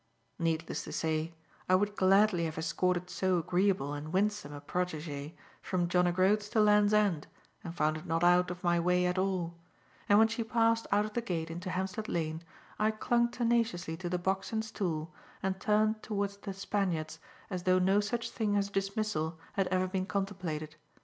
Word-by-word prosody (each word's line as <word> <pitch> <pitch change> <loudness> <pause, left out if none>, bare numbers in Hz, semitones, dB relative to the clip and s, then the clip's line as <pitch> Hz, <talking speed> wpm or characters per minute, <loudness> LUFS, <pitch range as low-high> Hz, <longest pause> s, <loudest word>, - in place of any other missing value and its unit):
Needless 165 -1 -1
to - - -7
say, 160 +1 -1 0.3
I 185 - +6
would 205 +2 +1
gladly 195 -2 +4
have 160 -1 -4
escorted 180 +2 0
so 185 0 +1
agreeable 175 -3 +1
and 150 +2 -6
winsome 205 -4 0
a 145 - -7
protegee 155 -2 -4 0.3
from 180 -2 -1
John 180 0 +3
o' - - +2
Groats 200 +4 +2
to 225 - +1
Land's 210 -1 +5
End 205 -8 +2 0.4
and 170 0 -7
found 155 0 +1
it 155 - -10
not 165 +1 0
out 175 0 +5
of 180 0 -7
my 175 -1 +3
way 180 +1 +2
at 180 +1 0
all; 185 -3 -1 0.6
and 205 - +7
when 220 +1 +6
she 230 +1 -2
passed 230 0 +2
out 205 +1 +3
of 215 - -7
the 240 - 0
gate 165 -7 -3
into 175 +3 -5
Hampstead 190 +4 -3
Lane, 160 -1 -2 0.4
I 215 +1 +3
clung 235 +2 +1
tenaciously 230 -8 0
to 175 0 -4
the 180 - 0
box 190 +3 -1
and 220 -1 -1
stool 165 -7 -3 0.3
and 190 0 -1
turned 215 +1 +2
towards 200 -2 -2
"The 200 -1 -6
Spaniards" 175 -6 -2 0.3
as 180 -1 -2
though 185 +1 +3
no 190 +2 +3
such 230 +3 -2
thing 210 -3 0
as 200 -1 +1
a - - -22
dismissal 195 -5 -1 0.2
had 195 -2 +1
ever 185 0 +1
been 185 0 -2
contemplated. 180 -7 -3
185 Hz, 190 wpm, -31 LUFS, 170-205 Hz, 0.6 s, and